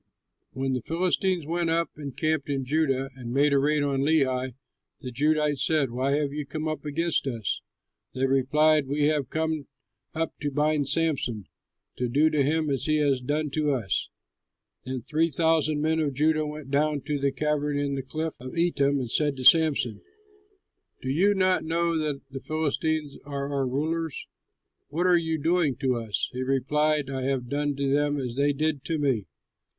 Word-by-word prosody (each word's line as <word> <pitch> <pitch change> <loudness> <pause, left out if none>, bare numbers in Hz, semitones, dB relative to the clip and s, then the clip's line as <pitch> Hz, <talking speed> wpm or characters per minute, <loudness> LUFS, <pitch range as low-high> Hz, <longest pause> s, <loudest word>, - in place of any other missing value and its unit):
When 135 0 -1
the 125 - -1
Philistines 180 - 0
went 170 +1 -1
up 165 +1 +1
and 140 -3 -8
camped 155 -2 0
in 135 -2 -1
Judah 135 -2 0
and 120 -3 -7
made 140 +3 +3
a 140 - +4
raid 150 +1 +2
on 140 -1 0
Lehi, 130 -4 +1 0.4
the 125 - -7
Judahites 150 +1 +1
said, 150 -5 +1
"Why 130 +3 0
have 145 -1 0
you 150 0 -3
come 155 +2 -4
up 155 -2 -3
against 160 0 0
us?" 115 -5 -2 0.5
They 130 +1 +1
replied, 145 +3 +3
"We 145 +2 0
have 145 -4 -1
come 160 -2 -2 0.5
up 160 0 -1
to 145 - -1
bind 150 0 +1
Samson, 140 - 0 0.5
to 125 -1 -1
do 150 +5 +3
to 150 -2 +2
him 155 +3 +1
what 140 -3 0
he 155 +3 +1
has 140 -4 +2
done 150 +3 -1
to 150 +1 0
us." 110 -9 -1 0.8
Then 130 -2 -4
three 160 +4 +1
thousand 155 -1 +2
men 160 +1 +1
of 145 -4 -1
Judah 155 +2 +2
went 150 -2 -8
down 150 0 +1
to 145 +1 -2
the 140 0 +1
cavern 150 +1 -1
in 145 -1 -1
the 135 - -2
cliff 155 +4 -4
of 130 +5 -8
Etam 140 -5 +2
and 130 -3 -2
said 145 0 +1
to 130 - -5
Samson, 140 -8 +4 1.0
"Do 130 - -1
you 195 +8 +3
not 185 -1 +2
know 170 +1 0
that 150 -3 -2
the 135 - -5
Philistines 155 0 -1
are 140 0 -3
our 135 -2 0
rulers? 155 +3 -2 0.6
What 165 +5 -1
are 180 -1 +5
you 160 -1 0
doing 160 -2 +1
to 130 0 0
us?" 115 -3 -2
He 125 - -3
replied, 140 +2 +1
"I 130 -1 -3
have 130 -3 -1
done 145 +1 -1
to 140 0 0
them 145 0 +1
as 125 -3 -4
they 140 +2 +2
did 150 0 -1
to 165 - -1
me." 130 - 0
145 Hz, 185 wpm, -26 LUFS, 135-155 Hz, 1.0 s, are